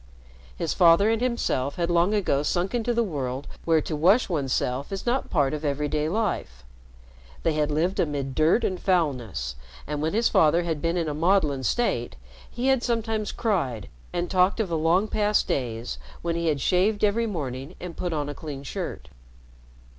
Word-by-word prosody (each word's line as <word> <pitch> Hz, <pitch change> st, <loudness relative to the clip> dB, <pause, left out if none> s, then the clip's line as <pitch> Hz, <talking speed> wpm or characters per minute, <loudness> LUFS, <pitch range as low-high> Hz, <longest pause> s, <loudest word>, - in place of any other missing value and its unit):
His -, -, -1 dB
father 175 Hz, +5 st, +5 dB
and 225 Hz, 0 st, 0 dB
himself 190 Hz, -, 0 dB
had 170 Hz, 0 st, -1 dB
long 175 Hz, +5 st, +3 dB
ago 175 Hz, -9 st, +1 dB
sunk 175 Hz, +5 st, -1 dB
into 240 Hz, 0 st, 0 dB
the 235 Hz, 0 st, +2 dB
world 140 Hz, -, -3 dB, 0.2 s
where 160 Hz, -2 st, +3 dB
to 155 Hz, -, -4 dB
wash 190 Hz, +12 st, +4 dB
one's 145 Hz, -7 st, -1 dB
self 130 Hz, +4 st, -1 dB
is 195 Hz, -, -4 dB
not 245 Hz, +2 st, +1 dB
a -, -, -17 dB
part 145 Hz, -4 st, +1 dB
of 150 Hz, 0 st, -4 dB
every 145 Hz, 0 st, 0 dB
day 150 Hz, +1 st, -1 dB
life. 175 Hz, -, -2 dB, 0.8 s
They 165 Hz, -, +2 dB
had 150 Hz, -1 st, 0 dB
lived 165 Hz, +6 st, 0 dB
amid 140 Hz, -4 st, -1 dB
dirt 160 Hz, -, +3 dB
and 185 Hz, -4 st, -1 dB
foulness, 125 Hz, -, -1 dB, 0.3 s
and 150 Hz, 0 st, -3 dB
when 160 Hz, +3 st, -1 dB
his 230 Hz, +1 st, +3 dB
father 165 Hz, +2 st, +4 dB
had 160 Hz, -3 st, -2 dB
been 165 Hz, +1 st, 0 dB
in 165 Hz, -2 st, 0 dB
a 150 Hz, -, -2 dB
maudlin 155 Hz, -4 st, +2 dB
state, 130 Hz, -, 0 dB, 0.3 s
he 245 Hz, +2 st, -4 dB
had 265 Hz, -2 st, +3 dB
sometimes 225 Hz, -3 st, -1 dB
cried 160 Hz, -, -1 dB, 0.2 s
and 175 Hz, 0 st, -1 dB
talked 185 Hz, +3 st, +2 dB
of 215 Hz, -5 st, 0 dB
the 165 Hz, -, -1 dB
long 165 Hz, +6 st, +2 dB
past 210 Hz, -1 st, +1 dB
days 120 Hz, -3 st, -3 dB, 0.2 s
when 170 Hz, -1 st, -1 dB
he 170 Hz, 0 st, -1 dB
had 145 Hz, -3 st, +1 dB
shaved 200 Hz, +7 st, +2 dB
every 225 Hz, +3 st, +2 dB
morning 140 Hz, -, -5 dB
and 180 Hz, -2 st, -7 dB
put 180 Hz, -, -3 dB
on 150 Hz, -3 st, -2 dB
a 145 Hz, -, -4 dB
clean 145 Hz, -3 st, -7 dB
shirt. -, -, -5 dB
165 Hz, 190 wpm, -25 LUFS, 145-200 Hz, 0.8 s, father